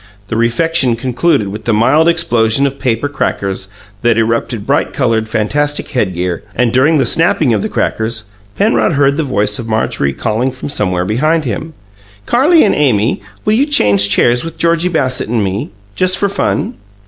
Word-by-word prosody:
The - - -2
refection 120 +3 +1
concluded 125 -1 0
with 105 +2 -8
the 115 - +1
mild 150 +9 +3
explosion 120 -6 +2
of 140 0 -3
paper 125 +1 -1
"crackers" 95 -9 -3 0.3
that 120 -1 +2
erupted 115 -1 -1
bright 140 +3 0
coloured, 115 -6 0
fantastic 145 +8 -1
headgear, 90 - -2
and, 120 -1 +1
during 145 +5 +3
the 135 - +2
snapping 155 -1 +2
of 105 - 0
the - - -3
"crackers", 110 0 -2 0.3
Penrod 115 -3 +2
heard 140 0 +2
the 160 - 0
voice 105 -6 0
of 115 - -6
Marjorie 110 -10 -1
calling 110 - -1
from 130 +2 -7
somewhere 90 -10 -1
behind 155 - 0
him, 150 +7 -5 0.5
"Carrie 310 +7 +4
and 205 - +2
Amy, 120 -7 +1 0.2
will 210 - +2
you 265 +6 +2
change 100 - +3
chairs 120 +4 +2
with 165 0 -7
Georgie 170 +1 +1
Bassett 130 -9 -1
and 115 -2 0
me 95 +1 -3 0.3
just 185 +1 +2
for 200 - +1
fun?" 205 +3 -1
120 Hz, 170 wpm, -14 LUFS, 110-155 Hz, 0.5 s, Carrie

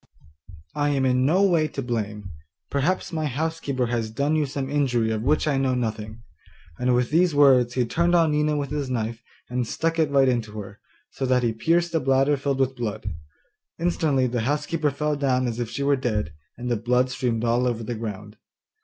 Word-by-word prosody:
I 145 0 0
am 135 -2 +1
in 130 0 +2
no 185 +6 +3
way 170 -5 +3
to 140 - -5
blame; 105 -5 -4 0.4
perhaps 150 +7 0
my 155 -2 -1
housekeeper 145 -2 -2
has 115 -2 -2
done 140 +7 0
you 150 -2 +1
some 135 -1 -4
injury 130 -6 +1
of 110 -1 -1
which 150 +6 +1
I 140 -3 +1
know 130 -1 +1
nothing.' 110 -1 -4 0.6
And 125 0 +2
with 125 +1 0
these 170 0 +3
words, 130 -4 +5
he 125 -2 +2
turned 170 +8 +1
on 165 -2 +4
Nina 150 0 +1
with 145 -1 -3
his 145 -3 -2
knife, 115 -2 -3 0.3
and 125 -1 -2
stuck 165 +5 -1
it 155 -2 +3
right 135 -1 +4
into 115 -4 -1
her, 100 0 -9 0.3
so 135 - -3
that 125 -1 +2
he 115 -1 +1
pierced 170 +9 +1
the 165 - +1
bladder 135 +1 +2
filled 140 0 -2
with 130 0 +1
blood. 110 -5 -4 0.6
Instantly 160 -6 +1
the 120 -1 -1
housekeeper 150 +4 0
fell 150 +2 -1
down 130 -3 +1
as 115 0 -3
if 120 -2 -2
she 120 +4 -3
were 140 0 +3
dead, 110 - -2 0.2
and 125 +1 -5
the 120 - +2
blood 125 +3 +1
streamed 120 -3 -1
all 120 +2 +2
over 115 -2 -2
the 120 - -4
ground. 105 -1 -7
130 Hz, 205 wpm, -24 LUFS, 120-145 Hz, 0.6 s, words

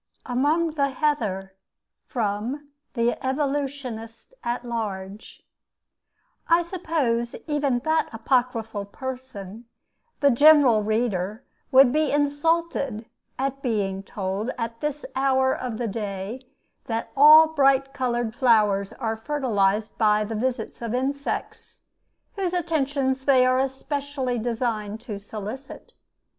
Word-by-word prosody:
AMONG 300 +7 +1
THE 280 -2 0
HEATHER 225 -10 -1 0.5
From 240 +5 -3 0.3
'The 235 0 0
Evolutionist 265 - -3
at 240 +1 -2
Large' 205 -4 -5 1.0
I 335 +1 +4
suppose 305 -10 -1
even 290 -4 0
that 315 0 +1
apocryphal 225 -3 -1
person, 235 -2 -7 0.5
the 285 -1 +5
general 280 -4 +6
reader, 215 -1 -1 0.3
would 265 -1 +7
be 305 -1 +2
insulted 290 -4 0 0.3
at 275 +1 -2
being 200 -6 -1
told 195 +3 -4
at 230 -1 -4
this 295 -1 -3
hour 265 0 +2
of 245 -4 -4
the 235 - -2
day 205 +4 -5 0.4
that 225 -1 -3
all 305 +3 +9
bright 275 -3 +3
colored 240 -4 -1
flowers 215 -6 +3
are 225 -3 -3
fertilized 220 -5 0
by 210 -1 +4
the 215 +2 -5
visits 240 +1 -3
of 235 0 -2
insects, 280 +2 -3 0.5
whose 380 -3 -2
attentions 280 -6 0
they 260 -3 +5
are 255 +1 +3
specially 270 -2 -3
designed 220 -2 -2
to 215 -5 -6
solicit. 215 +6 -8
250 Hz, 110 wpm, -24 LUFS, 220-280 Hz, 1.0 s, all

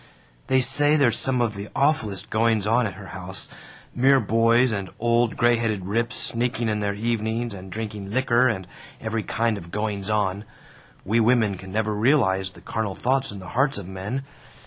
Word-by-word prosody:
"They 130 0 +3
say 145 +3 +4
there's 135 -6 +3
some 130 -2 +1
of 115 -3 0
the 100 0 -7
awfullest 135 - 0
goings 110 -2 +2
on 115 +2 +2
at 95 - -7
her - - -10
house - - -5 0.5
mere 135 +2 +4
boys 115 +2 +3
and 100 -3 -3
old 120 0 +1
gray 120 0 +4
headed 110 -5 -2
rips 115 +4 -1
sneaking 120 -1 +1
in 105 -1 -1
there 100 -1 -1
evenings 115 +1 -2
and 95 -1 -10
drinking 105 -2 -5
licker 125 +1 +3
and 100 -6 -2 0.3
every 110 0 -2
kind 115 0 -1
of 85 -2 -12
goings 105 0 -3
on. 100 -2 0 0.6
We 110 +5 +2
women 115 -3 +3
can't 95 +1 -10
never 110 +1 0
realize 105 -5 +2
the 95 - -16
carnal 110 -4 -3
thoughts 130 0 0
in 100 - -8
the 95 -2 -9
hearts 135 +1 +1
of 100 -3 -7
men. 100 +8 -4
110 Hz, 185 wpm, -24 LUFS, 100-120 Hz, 0.6 s, say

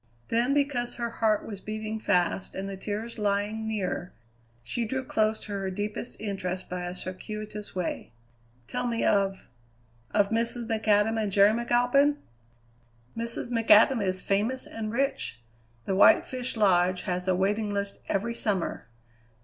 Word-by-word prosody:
Then, 240 +4 +2
because 275 -4 0
her 235 -1 -3
heart 220 -2 +1
was 200 -3 -6
beating 215 0 -4
fast 180 -2 +1
and 195 +1 -4
the 195 - -5
tears 215 +4 -5
lying 210 +2 0
near, 190 -4 -3 0.5
she 235 - -2
drew 260 +4 -2
close 215 -2 +1
to 210 - -6
her 195 -1 -2
deepest 205 +5 -4
interest 185 -3 -3
by 180 0 -3
a 175 +1 -5
circuitous 210 +3 -6
way. 180 -2 -3 0.5
"Tell 245 - -2
me 230 -1 0
of 195 -2 +1 0.6
of 200 0 +2
Mrs. 235 +1 0
McAdam 220 0 +2
and 210 -2 -1
Jerry 200 +2 +6
McAlpin?" 245 +5 +3 1.0
"Mrs. 230 +1 -2
McAdam 225 0 +5
is 185 -1 -1
famous 220 +7 +1
and 220 -1 -5
rich. 240 - -1 0.5
The 195 - -1
White 190 - +6
Fish 255 -2 -3
Lodge 185 -3 +3
has 180 0 -2
a 185 - +3
waiting 205 +3 0
list 200 0 -3
every 230 +4 0
summer. 200 - -2
215 Hz, 150 wpm, -28 LUFS, 195-230 Hz, 1.0 s, Jerry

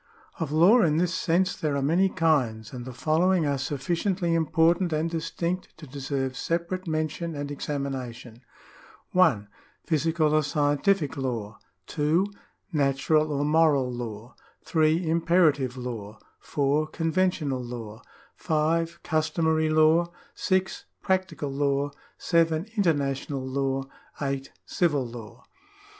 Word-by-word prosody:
Of 160 -4 -2
law 180 +10 +6
in 155 -5 +2
this 180 +1 +1
sense 185 +1 +1
there 150 -3 -1
are 140 - 0
many 175 +7 +3
kinds, 130 -11 0
and 125 -1 -6
the 130 - -6
follow 160 +8 +1
ing 180 -4 +2
are 140 -2 0
sufficiently 170 +6 -1
important 165 +2 +2
and 155 +1 0
distinct 170 +2 -3
to 155 - -10
deserve 135 -1 -3
separate 170 +6 -2
mention 155 +1 -2
and 145 0 -4
examination: 130 -5 -5 0.7
(1) 125 - +3 0.4
Physical 160 -1 +1
or 155 - +4
Scientific 150 +3 +1
law, 115 -6 -4 0.3
(2) 155 +5 +1 0.5
Natural 150 +2 +2
or 145 0 0
Moral 150 -4 +3
law, 120 -1 -7 0.3
(3) 160 +1 +2
Imperative 160 -6 +2
law, 110 -4 -6 0.2
(4) 145 +2 0
Conven 175 +3 +1
tional 140 -8 -3
law, 115 -2 -7 0.4
(5) 165 +1 0
Customary 160 0 +1
law, 155 +2 +4 0.2
(6) 190 -1 -1 0.2
Practical 185 -6 -1
law, 140 0 0 0.3
(7) 165 -1 +1
Inter 200 -7 +3
national 135 -1 -3
law, 135 0 -1 0.4
(8) 135 -1 -3 0.2
Civil 150 -7 +1
law. 115 -2 -10
155 Hz, 125 wpm, -26 LUFS, 135-165 Hz, 0.7 s, law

